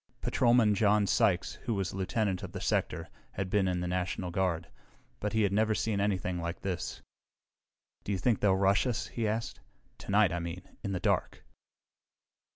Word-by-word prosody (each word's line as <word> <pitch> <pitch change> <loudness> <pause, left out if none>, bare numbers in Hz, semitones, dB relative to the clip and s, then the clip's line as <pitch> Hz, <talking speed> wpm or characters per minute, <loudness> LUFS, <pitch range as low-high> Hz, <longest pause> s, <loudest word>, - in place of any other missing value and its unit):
Patrolman 120 -3 +3
John 105 0 +3
Sykes, 90 -2 +1
who 115 -4 0
was 95 -2 -2
lieutenant 95 0 -1
of - - -7
the - - -4
sector, - - -1 0.3
had 95 -1 -3
been 100 -2 +3
in 90 -1 0
the 90 - -2
National 90 0 -2
Guard, 85 -2 0 0.5
but 105 +1 -2
he 110 -1 +3
had 100 -1 +1
never 110 +1 +2
seen 105 -2 0
anything 95 -3 0
like 85 +1 -4
this. 90 -3 -4 1.0
"Do - - -3
you 100 - +1
think 110 +5 +1
they'll 100 -2 +3
rush 100 +4 +3
us?" 120 - -2
he 115 -2 -2
asked. 110 +2 -2 0.4
"Tonight, 100 -3 +3
I 85 - -1
mean, 85 +2 -5 0.2
in 100 - -2
the 90 - -1
dark." - - -1
100 Hz, 175 wpm, -30 LUFS, 90-105 Hz, 1.0 s, Patrolman